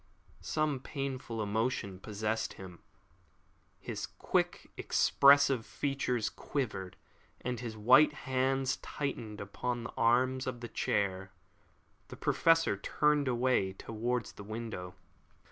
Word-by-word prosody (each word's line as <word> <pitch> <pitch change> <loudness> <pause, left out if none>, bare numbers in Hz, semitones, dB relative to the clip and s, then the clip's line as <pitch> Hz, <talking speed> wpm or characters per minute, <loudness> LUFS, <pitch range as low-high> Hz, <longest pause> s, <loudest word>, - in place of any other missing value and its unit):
Some 155 -3 0
painful 130 -5 -4
emotion 105 -2 -1
possessed 110 +2 -2
him. 90 -2 -11 1.0
His - - -5
quick, - - -1
expressive 140 -3 +5
features 130 -4 -1
quivered, 105 -10 -4 0.4
and 125 -2 -3
his 115 -2 -6
white 125 +9 +6
hands 130 0 +1
tightened 115 -7 -5
upon 120 +4 -3
the 115 - -7
arms 130 +3 +2
of 120 -2 -4
the 120 - -6
chair. 95 -2 -1 0.7
The - - -10
Professor 165 -10 +3
turned 150 +7 +1
away 120 -6 +1
towards 115 +3 -3
the - - -11
window. 110 -4 -6
120 Hz, 110 wpm, -32 LUFS, 105-135 Hz, 1.0 s, white